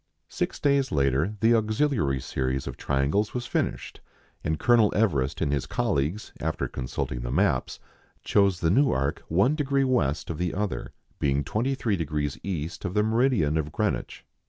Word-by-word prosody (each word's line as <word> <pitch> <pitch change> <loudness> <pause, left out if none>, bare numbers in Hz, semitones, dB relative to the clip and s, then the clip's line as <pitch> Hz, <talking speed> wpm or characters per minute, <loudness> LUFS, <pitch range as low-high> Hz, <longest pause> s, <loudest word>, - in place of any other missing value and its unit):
Six - - -3
days 140 -2 +2
later 70 +7 +1
the 115 +1 +5
auxiliary 110 - +1
series 65 +1 -2
of - - -5
triangles 75 - 0
was 125 -1 -2
finished, - - -3 0.4
and 80 0 0
Colonel 120 -1 +4
Everest 75 -11 +1
and 70 - +1
his 70 - -1
colleagues, 80 +10 -1
after - - -2
consulting 60 -1 -4
the - - -4
maps, - - +1 0.4
chose 100 -4 +2
the 80 - +2
new 140 +8 +4
arc 70 +2 -1
one 100 - +3
degree 140 -2 +1
west 120 - 0
of 80 - -6
the 90 -1 -1
other, 105 0 -3 0.3
being 70 0 +1
23° 95 - -1
east 85 -4 -4
of 95 0 -3
the 105 - +3
meridian 110 - +2
of 75 -1 -3
Greenwich. - - -2
90 Hz, 155 wpm, -26 LUFS, 70-115 Hz, 0.4 s, the